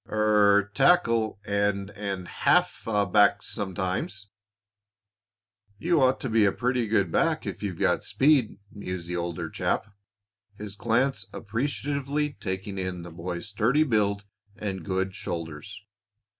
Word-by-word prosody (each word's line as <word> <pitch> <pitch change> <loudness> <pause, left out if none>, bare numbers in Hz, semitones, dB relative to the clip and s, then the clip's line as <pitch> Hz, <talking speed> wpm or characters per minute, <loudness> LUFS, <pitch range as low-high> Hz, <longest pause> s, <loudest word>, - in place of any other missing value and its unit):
"Er 105 -1 +3
tackle, 115 - +3
and 100 -1 0
and 100 -3 -5
half - - +1 0.3
back 105 0 +4
sometimes." 100 0 -4 1.5
"You 165 +5 +2
ought 130 0 +3
to 130 - -3
be 110 -1 +4
a 100 - +4
pretty 125 0 0
good 100 -5 +1
back - - +1
if - - -5
you've 95 -5 -3
got - - +1
speed," 135 -6 +2
mused 90 -4 -6
the 90 - -3
older 85 -1 -3
chap, - - -1 0.7
his 105 -1 -7
glance 120 +5 0
appreciatively 140 +5 -2
taking 95 0 -4
in 90 -2 -4
the 85 - -9
boy's 85 +4 -5
sturdy 115 +8 +2
build 105 -6 0 0.3
and 100 -4 -4
good 95 +1 -1
shoulders. 85 +4 -6
105 Hz, 130 wpm, -26 LUFS, 95-115 Hz, 1.5 s, back